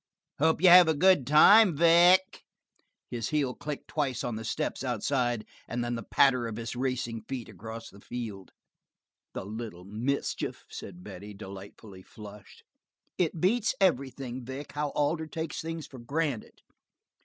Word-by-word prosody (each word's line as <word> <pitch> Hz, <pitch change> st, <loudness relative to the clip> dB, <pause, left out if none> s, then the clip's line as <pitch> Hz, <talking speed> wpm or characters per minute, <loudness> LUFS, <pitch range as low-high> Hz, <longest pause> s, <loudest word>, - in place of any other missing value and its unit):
Hope 160 Hz, +3 st, +2 dB
you 185 Hz, -, +8 dB
have 180 Hz, -1 st, +9 dB
a 160 Hz, -, +2 dB
good 180 Hz, -5 st, +4 dB
time, 180 Hz, +4 st, +7 dB
Vic." 175 Hz, +3 st, +5 dB, 0.7 s
His 115 Hz, -2 st, -3 dB
heel 145 Hz, -5 st, 0 dB
clicked 150 Hz, +1 st, -7 dB
twice 135 Hz, -6 st, -2 dB
on 120 Hz, -2 st, -3 dB
the 110 Hz, -, -5 dB
steps 110 Hz, -, -3 dB
outside, 120 Hz, -1 st, -1 dB, 0.2 s
and 120 Hz, 0 st, -3 dB
then 120 Hz, 0 st, -2 dB
the 115 Hz, -, -3 dB
patter 125 Hz, +1 st, +3 dB
of 110 Hz, -, -5 dB
his 115 Hz, +1 st, -5 dB
racing 125 Hz, -3 st, -2 dB
feet 130 Hz, -4 st, -5 dB
across 115 Hz, 0 st, -9 dB
the 100 Hz, -, -16 dB
field. 110 Hz, -6 st, -7 dB, 0.9 s
"The -, -, -5 dB
little 105 Hz, -4 st, -7 dB
mischief!" 115 Hz, +8 st, -3 dB
said 90 Hz, -2 st, -9 dB
Betty, 100 Hz, +1 st, -9 dB
delightfully 100 Hz, 0 st, -11 dB
flushed. 105 Hz, 0 st, -13 dB, 0.6 s
"It 170 Hz, -2 st, 0 dB
beats 220 Hz, +7 st, +2 dB
everything, 130 Hz, -7 st, 0 dB
Vic, 130 Hz, +4 st, -7 dB
how 145 Hz, 0 st, -2 dB
Alder 155 Hz, +2 st, 0 dB
takes 160 Hz, 0 st, -5 dB
things 165 Hz, -1 st, -5 dB
for 130 Hz, -, -12 dB
granted." 140 Hz, -1 st, -3 dB
130 Hz, 150 wpm, -28 LUFS, 110-155 Hz, 0.9 s, have